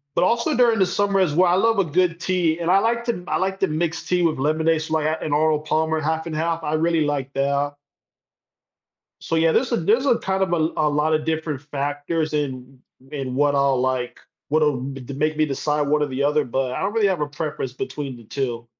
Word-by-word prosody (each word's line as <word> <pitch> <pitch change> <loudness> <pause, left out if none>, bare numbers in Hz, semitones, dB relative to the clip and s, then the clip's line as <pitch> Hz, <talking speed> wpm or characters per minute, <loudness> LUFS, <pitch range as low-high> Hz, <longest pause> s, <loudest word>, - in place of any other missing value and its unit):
but - - +2
also 235 +9 +2
during 235 -3 +4
the 190 - +4
summer 200 +1 +1
as 160 -6 +1
well, 180 +1 +4
I 180 - +3
love 225 0 +3
a - - +2
good 170 +1 0
tea 175 -3 0
and 170 +1 0
I 195 - +6
like 235 +2 0
to 235 - +2
m 180 -3 -8
I - - -1
like 190 +1 -1
to 195 - +3
mix 160 +1 -2
tea 180 -1 +1
with 160 -5 +1
lemonade, 155 +3 +1
so, 160 0 -3
like, 155 -1 +1
I 155 - +1
an 150 - -3
Arnold 155 0 +2
Palmer 160 +1 0
half 160 +2 -2
and 155 -2 -4
half, 165 +1 -1
I 150 0 -2
really 165 0 +2
like 140 -2 -2
that. 140 +1 0 1.5
So 165 - -2
yeah, 160 0 +3
there's 255 0 +1
a - - +3
there's 225 +11 +2
a 235 - +3
kind 190 0 -1
of 180 -2 0
a - - +3 0.2
a 150 - +3
lotta 155 +1 +1
different 160 -3 -2
factors 145 +2 -3
in 130 -3 -4 0.2
w 135 +1 -22
w 145 -2 -5
in 125 - -5
what 145 +1 +2
I'll 140 -2 +2
like. 130 -1 -2 0.3
What'll 150 -3 +2
d 135 0 -6
b 135 +3 -7
make 155 +2 0
me 155 0 +2
decide 150 +2 -1
one 150 +1 +1
or - - +2
the 135 0 -3
other, 150 +1 +2
but 130 +1 -2
I - - -3
don't 195 +2 -1
really 220 -2 +2
have 180 -5 -1
a 150 - 0
preference 150 -4 -4
between 135 -1 -5
the 115 - -14
2. 120 -1 -4
155 Hz, 245 wpm, -22 LUFS, 145-175 Hz, 1.5 s, I